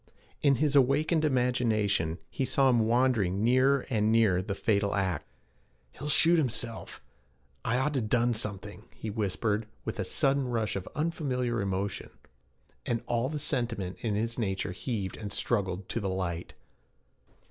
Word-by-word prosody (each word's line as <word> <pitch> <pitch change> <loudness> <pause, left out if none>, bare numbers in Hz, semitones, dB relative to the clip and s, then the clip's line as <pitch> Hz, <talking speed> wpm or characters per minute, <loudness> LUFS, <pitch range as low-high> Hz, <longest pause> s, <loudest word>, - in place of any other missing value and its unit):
In 140 -2 +4
his 145 +2 +1
awakened 150 +4 +3
imagination, 115 - +1
he - - -2
saw 130 +1 +3
him 115 -2 +3
wandering 115 -6 +2
nearer 130 +3 +3
and 110 -2 +1
nearer 110 -5 +4
the 100 +1 -4
fatal 100 -1 +1
act. 95 -3 -1 0.6
'He'll 145 - -6
shoot 165 +3 +5
himself. 115 - -3 0.6
I 125 - +1
ought 140 +3 0
to 135 - 0
done 120 +2 +2
something,' 105 -1 -4
he 110 - -5
whispered, 105 +1 -1 0.2
with 110 - -4
a - - +1
sudden 135 - +1
rush 115 -3 -1
of 95 - -5
unfamiliar 130 -7 -1
emotion; 100 0 -3 0.7
and 115 -1 -2
all 120 +2 0
the 150 - -3
sentiment 120 -10 -2
in 110 -3 -1
his 115 +3 -2
nature 95 -3 -1
heaved 95 +1 -4
and 105 -2 -6
struggled 95 -4 -1
to - - -1
the 100 -3 -2
light. 90 -2 -3
115 Hz, 150 wpm, -29 LUFS, 100-130 Hz, 0.7 s, shoot